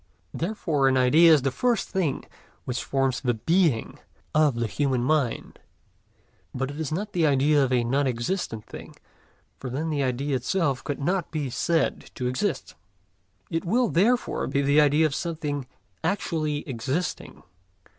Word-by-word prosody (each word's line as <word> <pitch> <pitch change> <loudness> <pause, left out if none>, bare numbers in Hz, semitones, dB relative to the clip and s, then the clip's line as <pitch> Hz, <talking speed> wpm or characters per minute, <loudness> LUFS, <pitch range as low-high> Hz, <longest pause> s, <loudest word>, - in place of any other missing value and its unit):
Therefore 165 -7 0
an 130 0 +3
idea 155 +7 +6
is 150 -4 +5
the 135 - +1
first 240 - 0
thing 170 -8 -1 0.4
which 125 0 -3
forms 135 -2 0
the 125 -3 0
Being 160 - +1 0.3
of 150 -4 +3
the 115 0 -1
human 130 +2 0
mind. 140 -3 -1 1.0
But 135 +2 -2
it 145 - -8
is 155 -3 -3
not 205 +6 -3
the 165 -3 +2
idea 145 +1 +3
of 130 - -1
a 125 -2 +2
non 135 +4 +1
existent 120 - -3
thing, - - -11 0.6
for 130 - -5
then 155 +6 -3
the 145 -2 0
idea 135 +2 -1
itself 135 +1 0
could 145 - -4
not 175 +4 -1
be 145 -5 -3
said 165 +5 0
to 125 - -4
exist. 135 +5 -2 0.8
It 165 - -1
will 235 +6 +1
therefore 235 +8 +1
be 140 +1 0
the 145 +2 +4
idea 150 +2 +4
of 150 - 0
something 150 -4 -3 0.4
actually 160 -5 -1
existing. 135 +7 -4
145 Hz, 155 wpm, -25 LUFS, 130-165 Hz, 1.0 s, idea